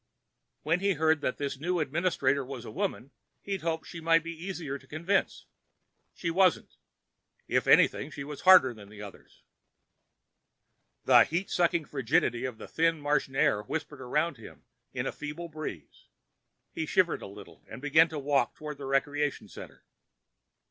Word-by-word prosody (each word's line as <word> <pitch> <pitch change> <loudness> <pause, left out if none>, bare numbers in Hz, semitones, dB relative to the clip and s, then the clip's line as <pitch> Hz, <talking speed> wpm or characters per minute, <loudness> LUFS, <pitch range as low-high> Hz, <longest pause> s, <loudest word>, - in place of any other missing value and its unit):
When 165 +4 +1
he'd 200 0 +1
heard 160 0 +2
that 130 - -2
this 140 -2 -4
new 175 +3 -1
administrator 150 -3 0
was 130 -2 -8
a - - -8
woman, 170 - -3 0.3
he'd 195 -2 -3
hoped 160 -1 -2
she 170 - -8
might 165 0 +3
be 165 - -5
easier 165 -5 -5
to - - -21
convince. 170 +6 -1 0.7
She 170 - -2
wasn't. 185 +1 +2 0.7
If - - 0
anything, - - +4
she 140 -2 -7
was 145 0 -8
harder 185 -9 +7
than 105 -3 -14
the 105 0 -10
others. 100 - -14 1.6
The - - +7
heat 175 +4 -3
sucking 170 -2 +1
frigidity 130 -3 0
of 125 -3 -5
the - - -10
thin 165 0 +1
Martian 145 -2 -1
air 105 -6 +2
whispered 145 +4 -5
around 150 +4 -1
him 110 - -13 0.3
in - - -3
a - - -1
feeble 150 +3 -7
breeze. 155 - -8 0.6
He - - -4
shivered - - +2
a - - -7
little - - -13
and 110 - -8
began 155 +4 +4
walking 140 -4 0
toward 150 -2 -7
the 140 - -6
recreation 145 +1 -1
center. - - -12
150 Hz, 160 wpm, -29 LUFS, 135-165 Hz, 1.6 s, harder